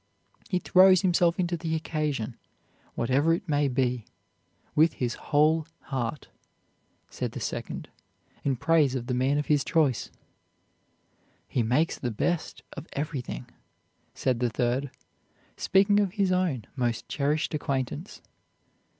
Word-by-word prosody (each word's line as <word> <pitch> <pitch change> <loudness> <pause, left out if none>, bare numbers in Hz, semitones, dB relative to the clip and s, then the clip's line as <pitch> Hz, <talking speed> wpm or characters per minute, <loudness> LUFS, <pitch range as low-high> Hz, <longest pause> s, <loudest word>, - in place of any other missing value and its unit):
"He 185 - +1
throws 185 +1 +6
himself 175 -2 +3
into 175 -1 +1
the 165 -1 -2
occasion, 150 -7 -2 0.6
whatever 140 +7 +2
it - - -8
may 145 -2 +2
be, 125 -3 0 0.7
with 160 +2 +4
his 120 -2 -2
whole 155 +2 +2 0.3
heart," 130 +2 -2 0.8
said - - -4
the - - -5
second, - - -4 0.6
in 135 -2 +1
praise 150 -1 +3
of 125 -2 -3
the 125 - -2
man 130 +3 +2
of 150 - 0
his 145 -2 +2
choice. 150 -6 +1 1.4
"He 125 - 0
makes 125 +9 +1
the 125 - -2
best 160 +9 -2
of 140 - -8
everything," 140 -4 -4 0.7
said 125 -3 0
the 120 -1 +1
third, 125 +4 0 0.7
speaking 200 +2 +3
of 200 -3 +1
his 200 -3 +1
own 175 - 0
most 120 -3 -1
cherished 150 +2 0
acquaintance. 140 +4 -3
145 Hz, 130 wpm, -27 LUFS, 130-165 Hz, 1.4 s, throws